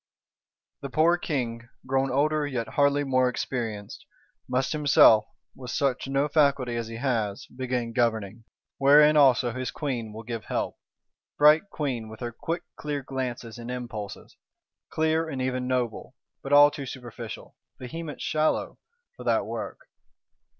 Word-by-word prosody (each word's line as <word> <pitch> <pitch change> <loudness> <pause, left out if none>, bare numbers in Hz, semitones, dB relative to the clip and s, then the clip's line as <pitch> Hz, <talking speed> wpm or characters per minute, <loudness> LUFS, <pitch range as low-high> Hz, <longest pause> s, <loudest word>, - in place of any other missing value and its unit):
The 140 - -5
poor 160 +6 +4
King, 120 -9 -3 0.2
grown 135 +1 +1
older 150 +3 +1
yet 120 -5 -3
hardly 145 0 +2
more 130 -2 +2
experienced, 115 -5 -4 0.5
must 130 +1 0
himself, 135 -7 +6 0.3
with 125 -2 -9
such 135 +1 0
no 135 +2 +1
faculty 140 -5 +2
as 115 -1 -3
he 115 - -7
has, 115 -5 -1
begin 125 -2 -2
governing; 110 -2 -1 0.3
wherein 150 +2 +6
also 130 -4 +5
his 130 +1 -4
Queen 125 -7 -4
will 110 +2 -8
give 115 -1 -6
help. - - -2 0.6
Bright 155 +6 +5
Queen, 130 - -3
with 110 - -11
her 120 -1 -3
quick 165 +8 -4
clear 145 -2 -3
glances 125 -3 -5
and 120 +1 -7
impulses; 120 -5 -6 0.5
clear, 160 +1 0
and 135 -4 -4
even 130 0 -1
noble; 125 -1 -2 0.3
but 135 - -7
all 145 0 +8
too 140 -2 -6
superficial, 120 -3 -8 0.2
vehement 150 +4 -7
shallow, 155 0 0 0.4
for - - -10
that - - +2
work! - - -6
130 Hz, 145 wpm, -26 LUFS, 115-145 Hz, 0.6 s, all